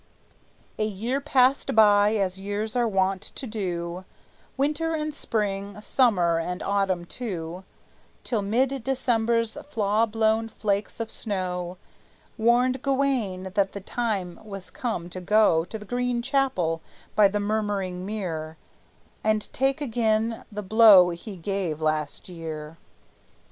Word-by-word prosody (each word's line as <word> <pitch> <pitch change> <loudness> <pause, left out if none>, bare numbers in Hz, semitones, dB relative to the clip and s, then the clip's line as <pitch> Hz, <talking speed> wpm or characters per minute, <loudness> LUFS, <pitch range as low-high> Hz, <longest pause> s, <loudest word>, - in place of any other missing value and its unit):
A - - +2
year 220 +6 -2
passed 270 -3 +2
by, 210 -1 +6
as 190 -2 -1
years 205 +3 -3
are 240 -1 +2
wont 190 -2 +1
to 265 - -6
do, 180 -5 -4 0.5
Winter 305 +4 0
and 305 -1 -2
spring, 205 -5 -2
summer 190 -8 +2
and 180 +2 -3
autumn 195 -3 0
too, 180 -5 -5 0.6
Till 225 -4 -1
mid 250 +5 0
December's 235 -2 0
flaw 215 -2 +2
blown 220 +1 +1
flakes 205 -1 -2
of 225 -1 -3
snow 180 -3 -3 0.6
Warned 245 +3 +3
Gawayne 260 -10 0
that 200 -1 +1
the 200 - -5
time 200 -4 -3
was 195 -3 -8
come 220 -9 -3
to 185 - -6
go 180 -4 +4
To 220 - -6
the 210 - -11
Green 245 +1 -1
Chapel 255 - 0 0.3
by 210 -1 +7
the 205 +1 -1
Murmuring 205 -3 -1
Mere, 165 -6 -4 0.7
And 215 -1 0
take 270 +3 +1
again 225 -3 0
the 210 0 -5
blow 200 -3 +7
he 190 +4 -7
gave 180 -3 -2
last 155 -2 -2
year. 160 -2 -7
210 Hz, 130 wpm, -26 LUFS, 185-235 Hz, 0.7 s, by